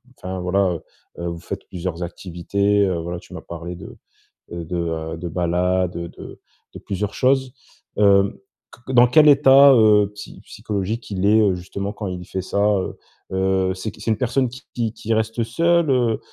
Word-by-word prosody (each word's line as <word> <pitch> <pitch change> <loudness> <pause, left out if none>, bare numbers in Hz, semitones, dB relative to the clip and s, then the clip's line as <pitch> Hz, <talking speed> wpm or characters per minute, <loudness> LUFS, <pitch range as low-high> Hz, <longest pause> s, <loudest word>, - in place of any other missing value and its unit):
enfin, 95 -2 -6
voilà, 95 +2 +1
heu 85 - -6 0.4
heu, - - -2
vous 85 0 -6
faites - - -7
plusieurs 90 -1 -4
activités, 100 +4 0
heu, 90 -3 -1
voilà, 85 +1 -5
tu - - -16
m'as - - -7
parlé 85 +1 -7
de, 85 - -11 0.5
heu, 85 -1 -6
de 80 -2 -3
de 85 +1 -5
balade, 90 +1 0
de 85 0 -9 0.4
de - - -7
plusieurs 100 +1 -4
choses. 130 -1 +1 0.4
Heu, 100 -1 +3 0.5
qu 130 - -4
dans 125 0 +7
quel 150 +5 +5
état, 140 -1 +7
heu, 105 -4 +4
psy 105 - -11
psychologique 105 +3 -5
il 95 -1 -1
est, 110 +2 +5
heu, 100 -3 +2
justement, 100 +3 -5
quand 105 - -7
il 90 -1 -5
fait 95 +1 -4
ça, 100 - -2
heu 100 -3 -1 0.3
heu? 95 0 +1
C'est 95 +4 -5
qui? - - -18
C'est 110 - -1
une 110 - +1
personne 125 +2 0
qui 130 +3 -11
qui 115 -2 -1
qui 115 - -6
reste 110 +1 -1
seule, 170 +7 +2
heu 120 -4 +1
100 Hz, 185 wpm, -21 LUFS, 90-115 Hz, 0.5 s, dans